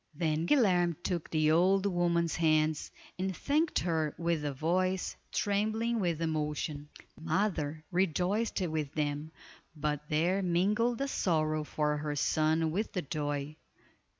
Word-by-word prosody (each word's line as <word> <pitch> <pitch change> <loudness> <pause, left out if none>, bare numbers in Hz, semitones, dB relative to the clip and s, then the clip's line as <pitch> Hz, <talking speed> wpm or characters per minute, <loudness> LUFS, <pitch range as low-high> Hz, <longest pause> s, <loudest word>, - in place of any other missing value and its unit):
Then 160 0 0
Guilerme 180 - +3
took 175 -3 -2
the 155 -1 +2
old 190 +4 +4
woman's 170 -3 +1
hands 155 -1 +2 0.3
and 190 -2 -2
thanked 305 +3 +1
her 160 -3 -1
with 170 -2 0
a 145 - -1
voice 185 +6 0 0.2
trembling 220 +3 0
with 170 -4 0
emotion. 150 -2 -2 0.3
The - - -17
mother 160 -3 -1
rejoiced 190 +5 0
with 155 -5 -2
them, 150 0 -2 0.4
but 150 0 -3
there 175 +6 +2
mingled 210 +7 +1
a 275 - 0
sorrow 155 - 0
for 150 0 -1
her 150 0 -3
son 155 +2 +1
with 210 +7 -2
the 180 - -2
joy. 145 0 -3
165 Hz, 135 wpm, -31 LUFS, 155-185 Hz, 0.4 s, old